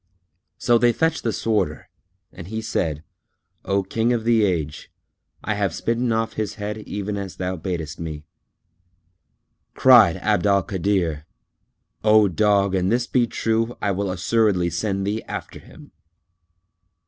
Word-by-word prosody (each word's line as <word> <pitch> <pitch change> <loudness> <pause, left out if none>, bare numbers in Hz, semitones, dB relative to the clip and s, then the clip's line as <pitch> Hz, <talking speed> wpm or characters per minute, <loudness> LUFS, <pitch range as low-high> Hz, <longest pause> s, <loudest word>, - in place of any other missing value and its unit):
So 120 -1 +3
they 120 0 +4
fetched 160 +3 0
the 115 - -1
Sworder 110 -1 -1 0.5
and 85 - -10
he 110 +2 -4
said, 80 -9 -2 0.6
"O 100 0 0
King 115 +5 0
of 115 -2 -1
the 115 -1 +3
Age, 80 -7 -2 0.5
I 105 - -1
have 100 -5 -1
smitten 115 +1 -1
off 115 0 -1
his 110 -1 -3
head 105 0 -5
even 105 -1 -4
as 100 -2 -6
thou 90 0 -3
badest 80 -3 -5
me." 80 -2 -6 1.5
Cried - - +6
Abd 90 - +1
al 100 -1 +3
Kadir 85 -5 -1 0.8
"O 105 -1 +5
dog, 100 +1 +2
an 95 -1 +1
this 120 +2 +1
be 120 -2 +1
true, 115 +1 -1
I 100 - 0
will 100 +1 -2
assuredly 95 -1 +1
send 100 +1 -2
thee 105 +3 -2
after - - -6
him." - - -16
100 Hz, 145 wpm, -22 LUFS, 90-115 Hz, 1.5 s, Cried